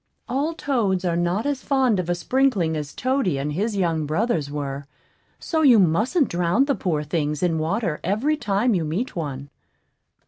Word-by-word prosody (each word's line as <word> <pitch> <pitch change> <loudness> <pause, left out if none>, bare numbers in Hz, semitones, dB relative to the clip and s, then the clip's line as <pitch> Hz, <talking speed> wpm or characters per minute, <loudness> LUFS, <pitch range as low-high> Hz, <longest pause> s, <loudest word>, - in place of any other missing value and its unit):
All 285 +6 -1
toads 210 - 0
are 170 -1 +1
not 175 +6 0
as 285 -2 -1
fond 260 -7 +2
of 175 -1 -3
a 175 - +2
sprinkling 200 -6 +1
as 150 -2 -4
Toady 255 - 0
and 145 +2 -2
his 205 +5 -1
young 165 -5 0
brothers 160 - 0
were; 140 -1 -5 0.5
so 320 -1 -1
you 260 -6 +7
mustn't 215 - +2
drown 175 +9 +1
the 280 - +1
poor 165 - -1
things 150 0 -2
in 165 -3 +1
water 165 +1 -1
every 225 - +1
time 220 -2 +1
you 175 -4 0
meet 175 +12 -3
one. 140 -4 -5
185 Hz, 175 wpm, -23 LUFS, 155-250 Hz, 0.5 s, you